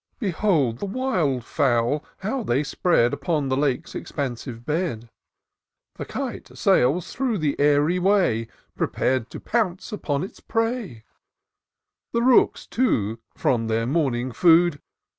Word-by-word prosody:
Behold 170 - +1
the 200 - -3
wild 180 - -1
fowl, 125 +3 +1 0.2
how 245 +7 -2
they 140 - 0
spread 140 -5 +2
Upon 145 0 -1
the 130 - +1
Lake's 140 +2 -1
expansive 120 -4 -5
bed: 150 -8 -2 0.9
The - - -6
kite - - -6
sails 150 +8 +2
through 255 -4 0
the 150 -5 0
airy 145 +4 +3
way, 180 - +2 0.3
Prepar'd 130 -3 0
to - - -8
pounce 210 -3 -1
upon 155 -8 -2
its 190 - -8
prey: 225 - -2 1.1
The 235 0 +1
rooks, 255 0 +4
too, 115 - 0 0.2
from 115 -3 0
their 115 +1 0
morning 130 -3 0
food. 165 +2 +4
150 Hz, 125 wpm, -24 LUFS, 125-190 Hz, 1.1 s, rooks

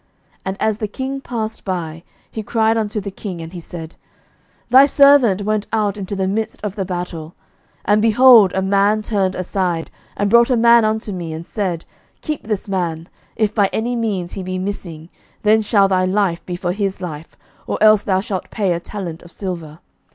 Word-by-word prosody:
11:020:039 - - -42 0.4
And 190 +1 -3
as 215 -1 +1
the 215 - -2
king 265 +5 -5
passed 225 -4 -5
by, 170 -4 -4 0.3
he 220 - -4
cried 225 0 +1
unto 215 -1 -1
the 200 -1 -6
king: 190 -2 -7
and 165 +1 -8
he 180 - -6
said, 165 -1 -9 0.8
Thy 265 +2 +8
servant 275 -9 +5
went 215 0 -1
out 210 -3 0
into 200 0 -5
the 190 -1 -1
midst 215 +3 -2
of 205 -2 -3
the 195 - -2
battle; 175 -3 -5 0.5
and, 210 +1 +3
behold, 230 -2 +7
a 190 - 0
man 200 +2 +2
turned 195 -4 0
aside, 180 -2 -2 0.3
and 205 - +1
brought 235 +1 +6
a 250 - +3
man 235 0 +6
unto 215 0 -1
me, 170 -4 -5
and 160 +1 -7
said, 185 -5 -3 0.4
Keep 305 -8 -5
this 210 -3 -2
man: 170 -4 -3 0.3
if 215 -2 0
by 205 -3 +2
any 240 +3 -1
means 205 -7 -2
he 195 - -5
be 185 0 -4
missing, 180 -4 -6 0.3
then 215 +1 +4
shall 205 -2 +3
thy 185 -1 +1
life 185 -2 0
be 180 - -3
for 175 0 -2
his 195 0 -2
life, 165 -3 -8 0.3
or - - -2
else 215 -1 +6
thou 190 -2 +1
shalt 195 -2 -4
pay 195 -5 0
a 170 - -2
talent 175 -3 -7
of 175 - -15
silver. 170 -6 -6
200 Hz, 195 wpm, -19 LUFS, 180-220 Hz, 0.8 s, Thy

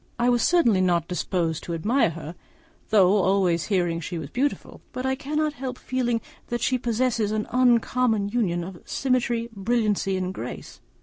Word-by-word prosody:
I 240 0 +2
was 240 -1 +3
certainly 235 - +4
not 175 -3 +1
disposed 175 -3 -1
to 170 - -3
admire 225 - +2
her, 160 0 -7 0.6
though 200 -2 +5
always 185 -3 +2
hearing 175 -5 0
she 175 +1 -5
was 160 - -7
beautiful; 280 +4 -2
but 255 - -4
I 265 - +1
cannot 300 +2 -1
help 255 -2 -5
feeling 240 -3 -1 0.3
that 240 -1 -3
she 255 +1 +1
possesses 230 -2 0
an 215 0 -1
uncommon 240 -3 +2
union 195 -7 0
of 180 0 -9
symmetry, 240 -3 0
brilliancy, 205 -2 0
and 185 0 -3
grace. - - -8
220 Hz, 165 wpm, -25 LUFS, 185-250 Hz, 0.6 s, though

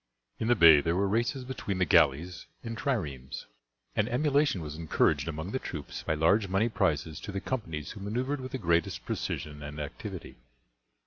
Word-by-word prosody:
In 110 - -1
the 120 - +5
bay 80 -7 +8
there 85 +3 0
were 100 +2 +2
races 120 +6 0
between 125 -7 -3
the 90 - +2
galleys 80 +4 +3 0.2
and 115 0 -4
triremes, 80 - -3 0.5
and - - +1
emulation 140 - +2
was 75 -1 -6
encouraged 80 -2 +1
among 80 +3 -4
the 130 - -1
troops 75 - -6
by 80 - -1
large 95 +7 +3
money 100 +5 +2
prizes 80 -8 0
to - - -7
the 100 - -2
companies 85 - -4
who - - -9
maneuvered 125 +8 -2
with 130 0 -7
the - - 0
greatest 85 -6 0
precision 75 -1 -4
and 75 +1 -7
activity. 75 -1 -7
95 Hz, 180 wpm, -29 LUFS, 75-115 Hz, 0.5 s, bay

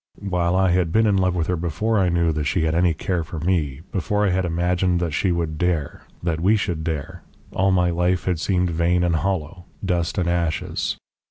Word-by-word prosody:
While 90 -1 +1
I 95 -1 +3
had 90 -2 +1
been 110 +5 +3
in 105 -2 +3
love 90 -1 +1
with 85 -2 0
her 90 - 0
before 90 +7 0
I 90 -2 +2
knew 85 -1 +2
that 75 -1 -2
she 85 +3 +1
had 80 0 +1
any 85 +1 +3
care 85 +1 -1
for 80 +1 -8
me, 80 -5 -1
before 105 +2 0
I 95 - +2
had 95 0 +1
imagined 90 +1 +1
that 85 -2 -1
she 90 +3 +1
would 80 -3 -2
dare 85 -5 -1 0.2
that 85 -2 -1
we 100 +5 +4
should 90 -7 -2
dare, 80 -4 -4 0.3
all 95 +1 +1
my 90 -2 +2
life 90 +1 0
had 90 -4 0
seemed 90 0 +1
vain 85 +2 +1
and 85 -2 +2
hollow, 90 -1 -3 0.2
dust 90 0 -1
and 90 -2 +1
ashes. 85 -2 -1
90 Hz, 220 wpm, -22 LUFS, 85-95 Hz, 0.3 s, we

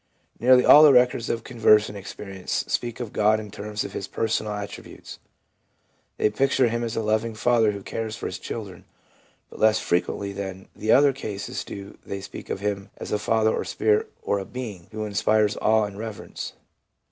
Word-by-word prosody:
Nearly 125 +1 +5
all 150 - +9
the 155 -2 +9
records 125 -2 +3
of 115 -1 -2
conversion 110 -3 +3
experience 95 -1 -5
speak 120 -1 -2
of 120 -4 -5
God 105 +1 +3
in 105 -2 -8
terms 105 0 -4
of - - -7
His 100 - -4
personal 110 0 -1
attributes. 105 0 -8 1.0
They 105 - +2
picture 130 +1 +2
Him 120 +1 -2
as 115 -1 -3
a 115 - -1
loving 110 +1 0
Father 115 -1 +3
who 100 -1 -7
cares 110 -1 -4
for - - -7
His - - -4
children; 100 -6 -7 0.7
but - - -12
less 110 0 +5
frequently 100 +3 -1
than 95 -1 -6
the 110 +1 0
other 140 +1 +6
cases 105 -7 -5
do 100 +1 -9
they 100 - -5
speak 95 - -9
of - - -3
Him 100 -1 -3
as - - -7
a 105 - +1
Father 110 +1 +2
or - - -2
Spirit, 105 -1 +1
or 100 - 0
a - - -4
Being 105 -9 -7
who 110 0 -4
inspires 105 +1 +2
awe 110 0 +3
and 100 -1 -5
reverence. 110 -2 -6
110 Hz, 185 wpm, -24 LUFS, 100-115 Hz, 1.0 s, all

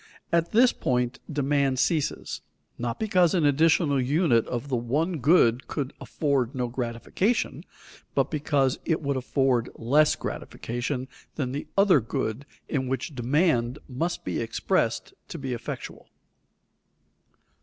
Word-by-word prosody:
At 170 0 +2
this 245 +3 +5
point 125 0 -1
demand 140 -2 +1
ceases, 150 +2 -1 0.4
not 120 -1 -3
because 185 -5 +3
an 165 -4 +2
additional 145 -1 +3
unit 130 -3 +2
of 125 +2 -3
the 135 - -1
one 145 +9 -1
good 125 -4 +4
could 140 -3 -3
afford 135 -4 0
no 125 -1 -1
gratification, 125 - -1 0.5
but - - +1
because 145 -4 +1
it 160 -2 0
would 140 0 0
afford 130 -2 +1
less 145 +7 +3
gratification 125 +2 -4 0.3
than 130 -4 -2
the 140 +2 -4
other 195 -6 +6
good 110 +4 -3 0.2
in 130 -3 -1
which 135 +3 -3
demand 125 -1 +1
must 160 +7 -3
be - - -2
expressed - - -1
to 170 - -7
be 135 -4 -4
effectual. 120 - -7
140 Hz, 130 wpm, -26 LUFS, 125-160 Hz, 0.5 s, other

